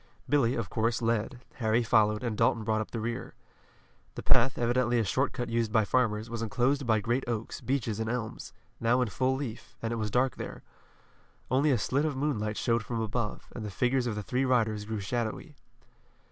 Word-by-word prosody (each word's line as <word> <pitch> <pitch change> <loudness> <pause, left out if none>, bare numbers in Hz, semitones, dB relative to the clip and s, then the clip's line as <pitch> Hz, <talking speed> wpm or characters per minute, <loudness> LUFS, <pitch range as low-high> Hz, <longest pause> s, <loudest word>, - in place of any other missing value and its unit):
Billy, 135 -4 +3
of 115 -5 -2
course, 115 +4 0
led, 115 +2 -1 0.2
Harry 115 0 +2
followed, 110 -1 +3
and 115 -3 -1
Dalton 115 0 +2
brought 110 0 +1
up 110 - -5
the 115 - -4
rear. 115 +2 -4 0.8
The - - -6
path, 125 +2 +4
evidently 120 0 +2
a 115 - +3
short 130 +8 +1
cut 120 - -3
used 115 -1 0
by 110 -1 +3
farmers, 110 -2 +1
was 115 0 -4
enclosed 125 +4 +1
by 110 -2 +4
great 120 +6 0
oaks, 115 -2 -3
beeches 120 -5 -1
and 110 0 -1
elms, 115 -2 -4 0.3
now 120 +2 +3
in 125 - +1
full 130 +5 +1
leaf, 130 -5 -6
and 115 0 -2
it - - -2
was 110 -1 -1
dark 125 +4 +1
there. - - -7 0.9
Only 135 +4 +3
a 130 - +4
slit 135 +6 0
of 150 -4 -1
moonlight 110 -7 -1
showed 115 -2 +1
from 115 +1 -3
above, 110 0 -3
and 115 - -5
the 105 - -4
figures 125 +5 +1
of 110 - -1
the 105 - -4
three 125 +5 0
riders 110 -5 +1
grew 110 -1 -3
shadowy. 120 - -3
115 Hz, 200 wpm, -29 LUFS, 110-125 Hz, 0.9 s, path